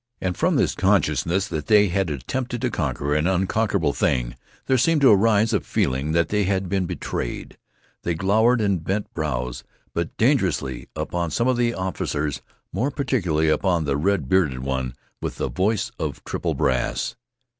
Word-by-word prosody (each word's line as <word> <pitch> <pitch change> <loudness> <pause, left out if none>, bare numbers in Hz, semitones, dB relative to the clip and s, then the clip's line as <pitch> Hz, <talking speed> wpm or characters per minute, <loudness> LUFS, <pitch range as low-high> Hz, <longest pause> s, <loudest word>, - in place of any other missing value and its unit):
And 90 -1 -2
from - - +1
this - - +2
consciousness 95 +4 +1
that 75 -2 -4
they 105 -2 +5
had 95 0 0
attempted 120 - -3
to - - 0
conquer 75 +1 -1
an 75 +3 +2
unconquerable 95 -3 +1
thing - - 0 0.3
there 130 -1 +2
seemed 160 +3 +3
to 135 - +7
arise 110 +2 +4
a 105 - +3
feeling 70 -1 -1
that 85 0 +2
they 105 -1 +1
had 95 0 0
been 95 -1 0
betrayed. - - -4 0.5
They 85 - -1
glowered 110 +7 +3
with 100 -6 0
bent 100 +4 -2
brows, 60 -6 -3 0.3
but 85 -1 -3
dangerously, 90 - +1
upon 85 -1 -2
some 115 +11 0
of 130 - +3
the 120 -1 +1
officers, 75 -6 -2 0.3
more 115 +10 0
particularly 90 - 0
upon 85 +1 +2
the 70 - 0
red 85 -1 0
bearded 75 -7 +2
one 65 -2 -2 0.3
with - - -3
the - - -2
voice 100 +2 0
of - - -4
triple - - -2
brass. - - 0
95 Hz, 165 wpm, -23 LUFS, 75-105 Hz, 0.5 s, to